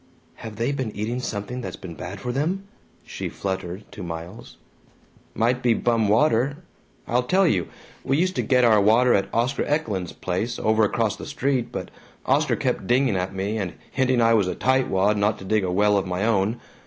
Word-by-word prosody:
"Have 110 -2 -8
they 115 +5 -1
been 130 -5 -2
eating 110 +5 -2
something 125 +1 -4
that's 95 -5 -6
been 90 -3 -9
bad 90 +4 -7
for 125 - -3
them?" 165 +9 -1 0.4
she - - -5
fluttered 95 0 -4
to 105 0 -9
Miles. 85 +4 -8 0.8
"Might 120 +3 +1
be 120 -2 +3
bum 115 -2 +1
water. 120 +4 +2 0.5
I'll 120 +2 +2
tell 185 +10 +2
you: 90 - +1 0.4
We 135 - +1
used 185 +3 +1
to - - +2
get 125 -2 +3
our 110 -3 +5
water 115 +5 +4
at 100 0 +1
Oscar 125 +4 0
Eklund's 105 - -1
place, 95 +6 -3
over 110 0 +2
across 110 0 0
the - - -8
street, 130 -2 -1
but - - -6 0.3
Oscar - - +2
kept - - -2
dinging 125 -3 +3
at 95 +1 -2
me, 100 +3 -2
and 95 -4 -3 0.2
hinting 130 -2 +2
I 115 0 +5
was 105 -5 +3
a - - -2
tightwad 105 -6 +2
not 105 +1 +1
to 95 - -10
dig 105 +1 +1
a 90 - -1
well 105 +2 +3
of 95 - -4
my 90 +3 -1
own. 110 0 +1
110 Hz, 195 wpm, -24 LUFS, 95-125 Hz, 0.8 s, our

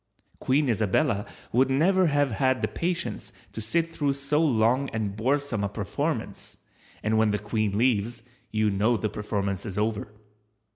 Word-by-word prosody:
Queen 140 +3 +2
Isabella 110 0 +1 0.2
would 130 +3 +3
never 180 +7 +3
have 145 -3 +2
had 130 +4 +1
the - - +3
patience 180 +1 -3 0.2
to 110 - -5
sit 160 +10 +1
through 145 -4 -1
so 140 +2 0
long 130 -1 +2
and 105 -3 -3
boresome 130 -1 0
a 100 - 0
performance, 100 -1 -3 0.5
and 110 +1 +2
when 110 -1 +4
the 105 - +1
Queen 105 0 -1
leaves, 115 -1 +1 0.3
you 110 -1 +2
know 110 +4 +2
the 110 +1 -1
performance 100 -2 -2
is 100 -4 -6
over. 105 0 -1
115 Hz, 155 wpm, -26 LUFS, 105-140 Hz, 0.5 s, when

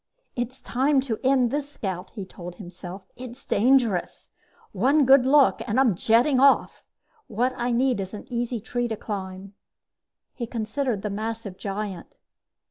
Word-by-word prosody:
"It's 245 +2 -4
time 270 +3 +2
to 240 -5 -3
end 255 -2 +3
this 290 0 -2
scout," 190 -8 -5
he 200 -4 -5
told 175 -1 -10
himself. 180 0 -9
"It's 255 +1 -10
dangerous. 230 -5 +1 0.4
One 270 +9 +3
good 265 0 +6
look 280 0 +5
and 230 +3 +1
I'm 255 -6 +4
jetting 235 - +3
off! 275 +1 +3 0.4
What 245 +4 0
I 245 -1 -1
need 250 -1 +2
is 195 +2 -5
an 205 - -9
easy 240 -1 -2
tree 240 +3 -2
to 220 -2 -4
climb." 195 -2 -6 0.8
He 235 -3 -5
considered 230 -1 -2
the 210 - -2
massive 215 -1 -4
giant. 195 -2 -6
230 Hz, 150 wpm, -25 LUFS, 200-260 Hz, 0.8 s, good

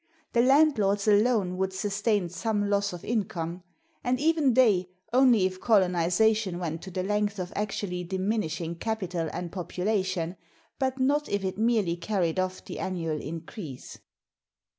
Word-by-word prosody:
The 235 - +4
landlords 245 -7 +3
alone 205 -3 +3
would 190 0 -1
sustain 205 0 0
some 205 +3 -1
loss 200 0 +1
of 175 -1 -8
income; 180 -6 -2 0.4
and 250 0 +1
even 305 -4 +3
they, 200 -8 +4 0.2
only 245 -6 +5
if 185 0 -3
colonization 190 0 +2
went 165 -2 -4
to 190 - -8
the 185 0 -3
length 210 +1 0
of 180 -1 -5
actually 195 -3 -2
diminishing 185 -3 -2
capital 180 -6 -2
and 175 -2 -5
population, 185 -1 -2 0.4
but 265 -1 0
not 290 +3 +1
if 200 -1 -1
it 190 +2 -3
merely 220 -7 +2
carried 175 -2 -1
off 185 0 -2
the - - -7
annual 165 -5 -2
increase. 160 - -8
195 Hz, 140 wpm, -27 LUFS, 180-220 Hz, 0.4 s, only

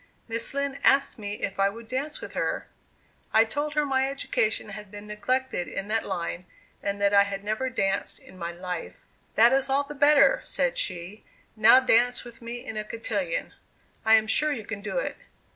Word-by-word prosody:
Miss 230 +3 -2
Lind 280 0 -2
asked 270 -2 +3
me 205 -1 -4
if 195 - -3
I 195 0 +4
would 225 +3 -10
dance 275 +5 -3
with - - -8
her. - - -2 0.7
I 220 +1 +6
told 290 +6 -3
her 300 -1 +2
my 265 -1 +1
education 220 -6 -1
had 210 0 -8
been 205 +1 -10
neglected 210 -1 -1
in 195 - -5
that 225 +1 +1
line, 180 -1 -4 0.3
and 200 0 -2
that 200 0 +2
I 200 - +7
had 200 0 -2
never 220 +5 -1
danced 195 -5 -1
in - - -15
my 170 -2 -4
life, 180 -1 -6 0.4
"That 235 +3 +6
is 270 0 +2
all 275 +1 +2
the 290 +1 -8
better," 285 -1 +5
said - - 0
she; 185 +3 -3 0.3
"now 220 +4 +7
dance 245 -1 +3
with 240 -1 -13
me 235 +1 -7
in 220 - -6
a 215 - -1
cotillion. 205 -5 -3 0.5
I 225 -1 +6
am 220 -1 +4
sure 300 +7 +2
you 230 -7 -4
can 205 -1 -5
do 215 - -4
it." - - -2
225 Hz, 195 wpm, -26 LUFS, 200-265 Hz, 0.7 s, I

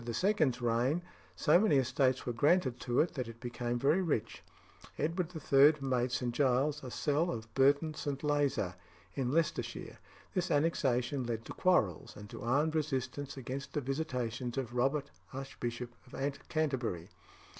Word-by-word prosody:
's 120 +7 -3 0.4
reign 120 +8 +1 0.3
so 175 - +5
many 205 -7 +3
estates 130 0 +2
were 120 - -2
granted 140 +1 +2
to 120 - 0
it 170 - 0
that 130 -4 -3
it 115 0 -10
became 120 0 -3
very 145 +9 +3
rich. 160 - -1 0.6
Edward 165 +3 -1
III. 145 0 +5
made 130 -2 0
St. 125 -1 -1
Giles 140 +3 +2
a 130 - -5
cell 150 +7 0
of 110 -7 -5
Burton 140 +4 +3
St. 145 -2 -4
Lazar 145 -11 +1 0.4
in 130 -3 -1
Leicestershire. 165 +2 -1 0.3
This 185 -1 0
annexation 140 -4 +1
led 115 -1 -3
to - - -7
quarrels, 110 - +1
and 105 0 -9
to - - -8
armed 145 +6 +1
resistance 140 -2 -2
against 135 +2 -5
the 150 - 0
visitations 125 -3 -3
of 125 -3 -3
Robert 135 +3 0 0.2
Archbishop 125 -3 -5 0.2
of - - -8 0.3
Canterbury. 130 - -1
135 Hz, 150 wpm, -33 LUFS, 120-150 Hz, 0.6 s, so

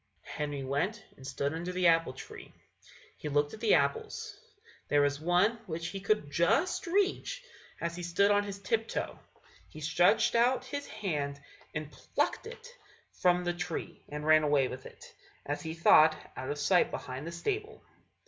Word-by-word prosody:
Henry 145 -2 -4
went 175 +12 -1
and 130 - -11
stood 140 +1 -2
under 170 +3 -4
the 180 0 -1
apple 165 -5 +4
tree. - - -10 0.7
He 150 - -5
looked 145 0 +1
at 220 - -8
the 220 -2 +4
apples; 140 -1 -1 0.5
there 145 0 +4
was 145 0 +1
one 180 +8 +2
which 165 0 -4
he 195 - -5
could 200 -7 0
just 175 - +2
reach 405 +7 0 0.4
as 170 0 -3
he 175 - -6
stood 175 +4 +2
on 205 0 +3
his 200 -1 -6
tip 225 +3 -1
toe. - - -4 0.5
He - - -11
stretched 180 +9 +3
out 245 +2 +3
his 285 +2 -5
hand 150 -10 -3 0.4
and 150 0 -4
plucked - - -2
it 475 +1 -10 0.4
from 180 0 +2
the 175 0 0
tree, 175 -1 -5
and 150 +1 -5
ran 155 -1 +5
with 130 -3 +1
it, - - -14 0.4
as 145 +1 -3
he 160 0 -5
thought, 155 -1 +6 0.2
out 130 +1 -5
of 145 - -2
sight 180 +5 +3
behind 130 +4 -6
the - - -4
stable. 415 - -3
170 Hz, 170 wpm, -31 LUFS, 145-210 Hz, 0.7 s, thought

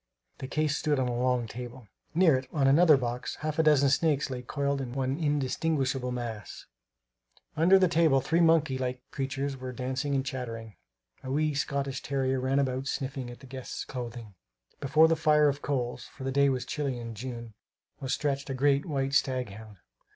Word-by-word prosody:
The 130 - -5
case 150 +1 0
stood 150 -2 0
on 130 -1 +1
a 120 - -2
long 125 -1 +1
table. 120 +1 -8 0.3
Near 170 -4 +5
it, 130 0 -3
on 145 -3 +1
another 155 +2 +6
box, 125 -1 -3
half 155 0 -2
a - - +7
dozen 145 -3 +4
snakes 140 -1 +1
lay 125 -1 -4
coiled 140 +2 -1
into 125 0 -5
one 135 +3 -1
indistinguishable 140 -3 0
mass. 115 -4 -6 0.9
Under 170 +5 +6
the 190 -1 +4
table 165 -5 +4
three 160 +6 +1
monkey 160 -5 +3
like 125 -1 -1
little 125 0 -33
creatures 135 0 -3
were 130 0 -6
dancing 130 +3 -2
and 135 0 0
chattering. 115 -5 -5 0.5
A 130 - -6
wee 150 +2 +1
Scotch 140 -1 -2
terrier 135 -1 0
ran 130 +2 0
about, 135 -1 0
sniffing 135 -2 -3
at 120 - -11
the - - -12
guests' 130 -1 -6
clothing. 120 -4 -7 0.5
Before 155 +3 +5
the 165 - +3
fire 150 -1 +4
of 140 0 -1
coals 125 -3 -2
for 135 - -11
the 135 - -1
day 140 +1 +4
was 130 -1 -1
chilly 135 -3 -2
for 115 -1 -6
June 115 0 -7 0.5
was 135 -3 -4
stretched 140 -1 -1
a 135 - -2
great 140 +3 +2
white 135 -3 -1
stag 130 -4 +1
hound. 105 0 -11
135 Hz, 190 wpm, -29 LUFS, 125-145 Hz, 0.9 s, a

